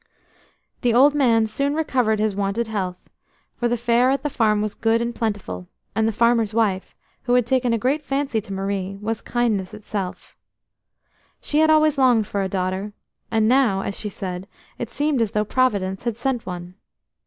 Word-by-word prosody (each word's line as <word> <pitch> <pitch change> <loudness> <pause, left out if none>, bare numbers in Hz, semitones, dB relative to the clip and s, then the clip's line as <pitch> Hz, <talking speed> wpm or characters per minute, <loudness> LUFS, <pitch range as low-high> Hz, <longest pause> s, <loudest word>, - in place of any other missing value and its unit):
The 240 -2 +2
old 280 +4 +6
man 235 -6 +3
soon 280 +7 -1
recovered 250 -8 +1
his 215 0 0
wonted 200 +4 -1
health, 185 -4 -2 0.6
for 240 - 0
the 240 0 0
fare 235 +2 +3
at 275 +1 0
the 295 - -1
farm 215 -4 +2
was 210 0 -2
good 225 0 +1
and 235 0 -2
plentiful, 200 - -3 0.3
and 220 +1 +1
the - - +2
farmer's 230 -1 +2
wife, 200 -5 0 0.3
who 245 -1 +3
had 250 -2 +3
taken 250 0 +1
a 230 - +2
great 265 +7 0
fancy 275 -4 -1
to 200 - -12
Marie, 195 0 -3
was 220 +1 -3
kindness 215 -5 -1
itself. 205 -3 -6 1.0
She 300 - 0
had 315 0 +5
always 310 -2 +4
longed 245 -5 +4
for 200 -1 -2
a 190 - -1
daughter, 190 +2 -2 0.4
and 220 -1 +2
now, 240 -6 +3
as 195 - -4
she 210 - -4
said, 185 -1 -6 0.3
it 235 - -4
seemed 290 0 0
as 225 - +1
though 210 0 +1
Providence 200 -5 0
had 235 -2 -1
sent 245 -1 -2
one. 180 0 -6
225 Hz, 185 wpm, -22 LUFS, 200-250 Hz, 1.0 s, old